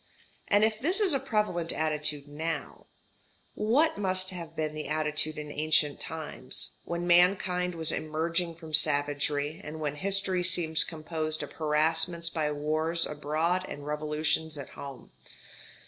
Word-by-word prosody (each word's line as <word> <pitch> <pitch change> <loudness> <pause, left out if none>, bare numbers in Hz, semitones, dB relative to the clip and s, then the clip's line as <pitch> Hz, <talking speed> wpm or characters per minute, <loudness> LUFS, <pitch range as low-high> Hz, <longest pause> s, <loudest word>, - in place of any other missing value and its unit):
And 205 +1 +4
if 215 0 +1
this 345 - +2
is 395 -6 +4
a 275 - +3
prevalent 210 -10 -1
attitude 150 -2 -1
now, 160 +3 -5 0.7
what 275 +9 +2
must 185 -1 +2
have 170 -3 -8
been 155 -1 -2
the 155 0 -5
attitude 155 0 +2
in 150 -1 -6
ancient 150 -1 +2
times, 155 -5 -5
when 170 +1 -3
mankind 180 0 +3
was 160 -1 -1
emerging 165 +2 -1
from 160 -1 -11
savagery, 145 0 +2
and 155 +1 -7
when 150 -1 -3
history 190 0 0
seems 170 -3 +4
composed 155 -1 -4
of - - -8
harassments 160 +2 +2
by 155 -2 -1
wars 155 +3 0
abroad 155 +5 -1
and 145 0 -7
revolutions 150 +1 -1
at 140 - -7
home? 140 -3 -10
160 Hz, 140 wpm, -29 LUFS, 150-180 Hz, 0.7 s, And